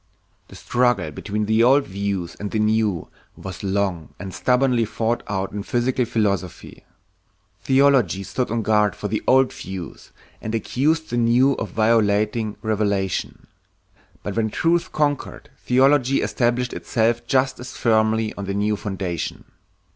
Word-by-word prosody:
The - - -14
struggle 120 -10 0
between 105 +7 -3
the 110 +2 +2
old 135 +3 +5
views 95 -3 -3
and 105 - -4
the 110 - -2
new 105 -4 +1 0.3
was 95 -2 -8
long 95 -5 -2
and 95 0 -7
stubbornly 125 -2 +2
fought 115 +2 -1
out 95 -1 -2
in 105 - -4
physical 120 +3 0
philosophy. 100 -6 -2 0.8
Theology 130 - +3
stood 125 +6 -2
on 115 0 -1
guard 105 -1 +2
for 105 - -4
the 110 +1 -2
old 130 0 +4
views 95 -2 -8 0.3
and 110 +1 -3
accused 155 +7 0
the 120 - -1
new 120 +4 +4
of 110 - -4
violating 110 -1 +1
revelation. 100 -4 -1 0.8
But 100 - -4
when 110 -1 0
truth 170 - 0
conquered, 145 -2 -2
theology 135 +1 +3
established 120 +3 0
itself 120 +1 0
just 135 +1 +1
as 125 +1 -9
firmly 110 -1 +2
on 100 - -5
the 100 0 -3
new 105 +1 +1
foundation. 95 -5 -4
110 Hz, 140 wpm, -22 LUFS, 100-125 Hz, 0.8 s, old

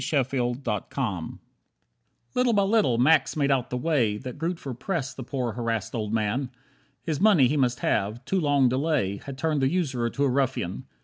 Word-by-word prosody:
12 135 -2 0 2.0
Little 250 -1 +2
by 200 -2 +3
little 195 - +2
Max 155 +6 +4
made 140 -1 +2
out 130 -3 +1
the 125 - -2
way 125 -7 +1
That 125 +4 -8
Grootver 165 -5 -3
pressed 145 -2 -3
that 130 - -5
poor 125 -3 -2
harassed 115 -2 -3
old 110 -3 -3
man. 115 +4 0 0.5
His 160 -1 -2
money 195 -11 +6
he 145 - 0
must 125 -4 +1
have, 110 +5 -1
too 190 - 0
long 145 -5 +3
delay 130 -6 0
Had 135 +5 -9
turned 150 0 0
the 135 - +3
usurer 135 -9 0
to 140 - -2
a - - +4
ruffian. 130 -9 -1
135 Hz, 175 wpm, -26 LUFS, 120-155 Hz, 2.0 s, money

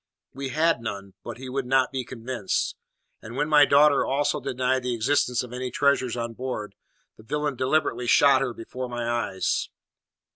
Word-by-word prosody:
We 135 0 -5
had 155 -1 +2
none, 100 -3 -6
but 120 - -7
he 130 +1 -8
would 130 0 -3
not 130 0 +3
be 130 -1 -3
convinced; 120 -4 -3 0.5
and 115 +2 -9
when 145 +2 0
my 150 -1 +6
daughter 145 +1 +5
also 145 +2 0
denied 130 0 0
the 125 -1 -2
existence 125 +1 +1
of 125 -1 -10
any 125 0 -3
treasure 130 -2 +1
on 115 0 -4
board, 115 -5 -5 0.4
the 110 - -15
villain 145 +3 -2
deliberately 130 -2 0
shot 135 +1 +5
her 135 -2 -1
before 125 +2 -6
my 120 -1 -3
eyes! 120 -5 -1
130 Hz, 175 wpm, -25 LUFS, 120-140 Hz, 0.5 s, my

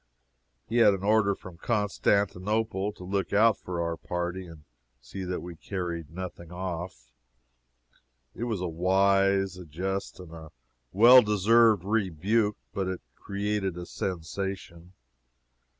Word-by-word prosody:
He 115 - -1
had 110 -4 +6
an 95 - -8
order 105 -1 +3
from 90 -3 -12
Constantinople 105 -1 0
to 95 - -12
look 95 0 -2
out 110 +1 +4
for 90 -1 -5
our 85 0 -1
party, 90 +1 -4
and 80 -3 -13 0.4
see 80 +10 -8
that 90 0 -3
we 90 -1 -8
carried 85 -3 -5
nothing 85 0 -8
off. 90 -8 -6 1.2
It 120 - -4
was 110 -6 -2
a 90 - -1
wise, 95 +2 +2
a 90 - -9
just, 95 +7 -4
and 90 -3 -11
a 80 -1 -10 0.4
well 120 +5 +8
deserved 105 -1 +4
rebuke, 105 +1 0 0.2
but 95 -2 -2
it 95 -1 -4
created 100 -1 -3
a 90 - -6
sensation. 90 0 -5
95 Hz, 135 wpm, -28 LUFS, 90-105 Hz, 1.2 s, well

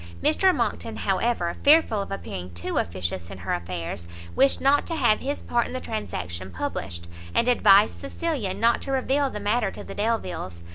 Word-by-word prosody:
Mr 375 +5 +4
Monckton, - - -2
however, 230 -8 0
fearful 285 -8 +5
of 195 - -6
appearing 90 - -6
too 85 - -2
officious 85 0 -3
in 95 - -8
her 90 0 -3
affairs, 85 -1 -4 0.3
wished 270 0 +4
not 280 +2 +3
to 330 - -2
have 240 -8 +3
his 285 +2 -3
part 240 0 +1
in - - -8
the 255 - -2
transaction 95 - -4
published, 85 -1 -5 0.3
and 235 - +3
advised 210 -4 +5
Cecilia 275 - -2
not 235 +1 +2
to 275 - -5
reveal 270 +1 +1
the 210 - -6
matter 210 +1 +1
to - - -9
the - - -8
Delviles. 205 - -2
215 Hz, 180 wpm, -25 LUFS, -, 0.3 s, fearful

